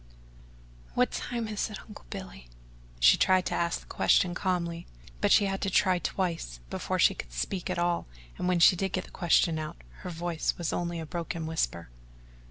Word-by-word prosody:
"What - - +3
time 235 -2 -3
is 215 +1 -2
it, 210 - -7
Uncle 210 - -12
Billy?" 185 - -8 0.5
She - - +7
tried 185 -1 +3
to - - -2
ask 170 0 0
the - - -18
question 180 -1 +3
calmly, 170 -2 -2 0.3
but - - +2
she 205 - +6
had 195 0 -2
to 195 - 0
try 185 -1 +3
twice 170 - -2
before - - -2
she - - +5
could - - -8
speak 175 - -3
at 185 - -1
all 175 0 0 0.3
and 180 - -1
when 180 -1 +2
she 170 - +7
did 190 +1 -2
get 185 - -1
the - - -15
question 170 -2 +2
out, 155 +2 -5 0.2
her 185 - -6
voice 170 -1 -2
was 170 -2 -2
only 170 -1 -2
a 160 - -5
broken 165 0 -4
whisper. 85 - -2
175 Hz, 190 wpm, -29 LUFS, 165-185 Hz, 0.5 s, She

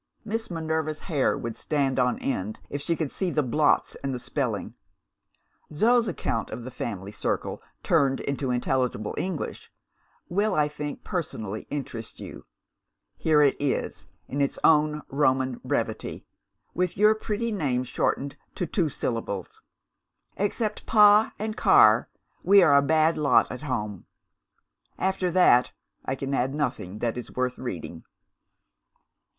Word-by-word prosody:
Miss 225 +1 -3
Minerva's 160 -2 -2
hair 150 -7 0
would 115 -2 -5
stand 140 -3 0
on 125 0 +2
end 105 -5 -3
if 145 - -3
she 165 +3 0
could 155 -4 -3
see 190 - -1
the 150 -3 +1
blots 145 +4 +2
and 135 - -1
the 130 - -2
spelling. 120 - -3 1.0
Zo's 230 +9 +3
account 140 - -2
of 115 +2 -6
the 130 - -7
family 100 -5 -5
circle 105 - -3 0.2
(turned 135 -1 +2
into 140 -1 -2
intelligible 125 -3 -1
English), 185 -5 -4 0.6
will 205 +5 +1
I 150 -1 +3
think 150 -1 -6
personally 110 - -4
interest 120 -6 -6
you. - - -10 0.7
Here 150 -2 +3
it 140 - +4
is, 145 -2 -2 0.2
in 140 - -2
its 140 - 0
own 150 -1 +4
Roman 130 -3 +1
brevity - - -3 0.5
with 180 0 -1
your 210 +2 +6
pretty 220 +1 -3
name 135 - 0
shortened 135 +2 -1 0.2
to 180 - -2
two 165 -1 0
syllables: 115 -8 -4 0.7
'Except 210 +2 -2
Pa 210 0 +6
and 215 +1 -3
Car, - - +5 0.3
we 195 0 +6
are 150 -4 +5
a 140 - +7
bad 155 +2 +2
lot 145 -2 +4
at 125 - -6
home.' 105 - -4 0.9
After 190 -1 0
that, 175 -8 +4 0.3
I 130 - -2
can 135 +1 -4
add 135 +1 0
nothing 105 -10 -3
that 120 +2 -2
is 125 - -10
worth 125 0 -1
reading. 85 -8 -6
145 Hz, 140 wpm, -26 LUFS, 125-175 Hz, 1.0 s, a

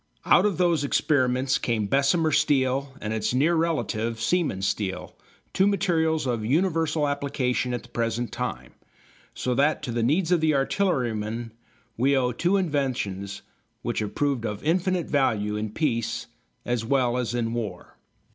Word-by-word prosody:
Out - - +5
of 200 - -2
those 170 -4 +2
experiments 130 -2 +1
came 115 -3 0
Bessemer 140 - +2
steel 140 -2 +2
and 105 +1 -3
its 110 +2 -1
near 150 +6 +3
relative, 120 -9 -1
Siemens 115 - 0
steel, 95 -3 -3 0.4
two 190 - +3
materials 165 -6 +1
of 120 -4 -1
universal 160 - +1
application 135 -3 -1
at 120 - -3
the 120 - -16
present 115 0 -2
time, - - -5 0.6
so 125 - -1
that 145 +4 +2
to 120 - -3
the 120 0 -1
needs 160 +9 +1
of 175 -3 +3
the 155 -2 +3
artilleryman 120 - -1 0.5
we 135 +4 +3
owe 125 -1 +1
two 175 +10 +1
inventions 125 - -2 0.4
which - - -1
have 105 -2 -4
proved 140 -5 0
of 105 -2 -4
infinite 180 +2 +1
value 105 -7 +1
in 105 0 -2
peace 115 -2 -1 0.4
as 120 -2 -1
well 125 -1 +1
as 125 -1 -1
in 115 -1 -1
war. 115 -3 -5
130 Hz, 155 wpm, -25 LUFS, 115-155 Hz, 0.6 s, Out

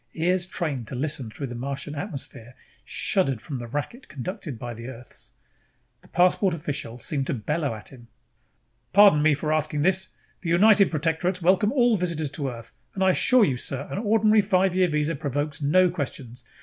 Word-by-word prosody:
Ears 180 +2 +1
trained 140 - -3
to 130 - -6
listen 140 -3 -2
through 140 +6 -6
the 120 - -7
Martian 140 +4 -5
atmosphere 140 - -7 0.3
shuddered 135 - 0
from 135 +3 -6
the 120 - -7
racket 145 - -5
conducted 150 -1 -6
by 120 +1 -6
Earth's. 120 +2 -10 0.7
The - - -18
passport 180 +1 +2
official 140 -6 -5
seemed 135 +2 -2
to - - -1
bellow 140 +3 -2
at 110 - -10
him. 120 -3 -15 0.9
"Pardon 200 -7 +7
me 155 -1 +4
for 155 +2 -1
asking 155 -1 0
this. 190 +2 +1 0.3
The 170 - -4
United 200 +3 +5
Protectorates 170 +3 -1
welcome 190 +4 +3
all 240 -5 +3
visitors 165 -5 -2
to 140 -4 -3
Earth 115 -2 -9 0.2
and 190 - 0
I 190 - +5
assure 250 +4 +5
you, 130 -4 -1
sir, 135 +3 -3
an - - -2
ordinary 215 0 +3
five 190 -2 +1
year 185 -1 +3
visa 150 +1 0
provokes 145 +1 -3
no 175 +5 +4
questions. 135 -7 -6
155 Hz, 175 wpm, -25 LUFS, 135-185 Hz, 0.9 s, Pardon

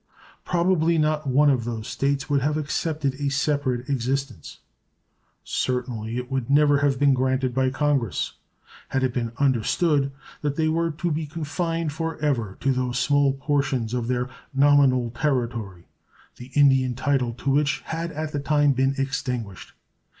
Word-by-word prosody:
Probably 170 -2 +2
not 155 -1 +1
one 145 +3 +4
of 125 -4 0
those 115 -2 -5
States 140 0 -1
would 140 -2 +1
have 150 +3 0
accepted 150 -1 -1
a 140 -1 0
separate 140 -3 -1
existence 135 - -3 0.9
certainly 120 -3 -2
it 125 +1 -5
would 130 -2 -2
never 145 0 +4
have 140 -2 +2
been 140 0 +4
granted 130 0 0
by 130 0 +2
Congress 140 -4 0 0.6
had 135 - 0
it 130 -2 0
been 115 -2 -2
understood 140 +2 +1 0.3
that 145 -1 -1
they 160 0 +1
were 165 +1 +1
to 165 +2 -3
be 155 0 -2
confined 165 0 -3
for 165 +1 -3
ever 120 -10 -1
to 135 - +2
those 125 -1 -1
small 140 +1 +3
portions 135 -4 -1
of 120 -2 -1
their 125 0 0 0.3
nominal 135 -4 +4
territory 120 - -2 0.5
the 125 +1 -10
Indian 135 -3 +4
title 130 -1 0
to 135 +3 -2
which 140 0 +1
had 165 +1 -4
at 155 0 -4
the 145 - -2
time 145 0 +3
been 135 +1 +1
extinguished. 125 -7 -3
140 Hz, 155 wpm, -24 LUFS, 125-150 Hz, 0.9 s, one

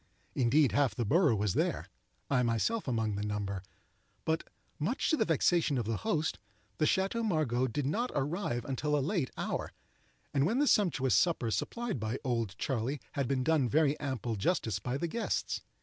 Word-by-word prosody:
Indeed, 135 +2 +3
half 140 -3 +2
the 120 - -1
borough 150 - +4
was 105 -2 0
there,—I 125 - -2
myself 125 - 0
among 110 -4 0
the 105 - -2
number,—but, 100 - -5 0.4
much 200 - 0
to - - +5
the - - +1
vexation 160 -2 +2
of 120 - -1
the 110 0 -1
host, 160 -9 -1 0.4
the 155 - +3
Chateau 195 +7 +1
Margaux 150 - +1
did 130 +3 -2
not 230 - 0
arrive 140 - -1
until 150 +2 0
a 140 0 0
late 170 - 0
hour, - - -3 0.6
and 140 -2 +3
when 225 +6 +1
the 290 - +3
sumptuous 150 - +3
supper 155 -10 +2
supplied 235 - -2
by 110 +4 -2
"Old 115 -7 -1
Charley" 130 +2 -1
had 140 -3 -1
been 130 -1 0
done 145 -4 +2
very 150 0 +3
ample 130 -5 -2
justice 110 - 0
by 125 +6 -2
the 170 - -1
guests. 230 +8 -2
135 Hz, 170 wpm, -31 LUFS, 115-160 Hz, 0.6 s, to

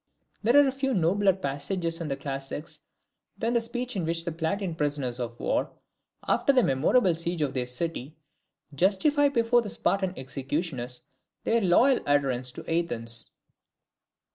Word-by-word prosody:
There 235 +6 +4
are 280 -2 +5
few 270 -1 -1
nobler 190 +3 +3
passages 165 +1 -3
in 165 - -3
the 135 -2 -2
classics 140 +3 -5 0.6
than 230 +3 -1
the 235 - +3
speech 245 +1 -4
in 185 - -1
which 165 +1 -2
the 170 - -2
Plataean 170 +3 -2
prisoners 145 -5 -1
of 120 -1 -5
war, - - 0 0.6
after - - +3
the 255 -3 +4
memorable 170 - +3
siege 170 0 -2
of 140 -2 -2
their 125 -2 -2
city, 150 +2 -4 0.6
justify 245 - +3
before 240 -2 +3
their 215 - -6
Spartan 190 -1 0
executioners 130 -1 -4 0.4
their 230 0 +2
loyal 235 +8 +4
adherence 135 -3 +2
to - - -9
Athens. 115 -9 -1
170 Hz, 145 wpm, -27 LUFS, 140-210 Hz, 0.6 s, are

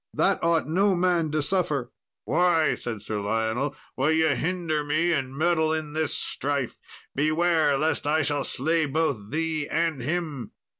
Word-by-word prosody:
That - - +2
ought 165 -2 +2
no 190 +4 +2
man 175 -3 +2
to 150 0 0
suffer." 150 -7 -1 0.3
"Why," 175 -3 +3
said 110 -4 -5
Sir 105 -1 -3
Lionel, 110 +7 -1 0.2
"will 135 +3 +1
ye 160 -1 +3
hinder 160 +1 -1
me 155 +4 +1
and 135 -3 -2
meddle 160 -1 +2
in 155 -2 -3
this 160 0 0
strife? 140 -3 -3 0.3
beware, 155 0 +2
lest 155 0 0
I 155 +1 +2
shall 145 0 0
slay 160 +3 0
both 140 -8 -1
thee 155 +1 -1
and 165 -4 0
him." 145 -4 -3
155 Hz, 155 wpm, -26 LUFS, 140-165 Hz, 0.3 s, Why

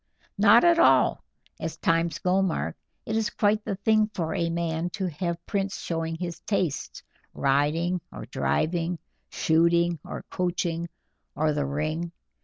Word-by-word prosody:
"Not 215 +3 +7
at 340 -1 +5
all, - - +4 0.4
as 160 - -4
times 165 -1 +1
go, 185 +3 +2
Mark; 190 -4 -1 0.3
it 220 - -2
is 220 -1 +1
quite 210 0 +1
the 200 - -2
thing 215 +2 +2
for 160 -3 -2
a 170 -1 0
man 165 0 -1
to 190 - -1
have 170 +1 -4
prints 195 -2 -2
showing 165 -1 -3
his 170 -1 -5
tastes, 180 -8 -2 0.3
riding 155 +6 +1
or - - -8
driving, 170 +2 0 0.3
shooting 170 +1 +2
or - - -7
coaching, 170 -2 -1 0.5
or 155 +1 +1
the 145 -1 -1
ring. 155 +4 -2
170 Hz, 145 wpm, -26 LUFS, 160-190 Hz, 0.5 s, Not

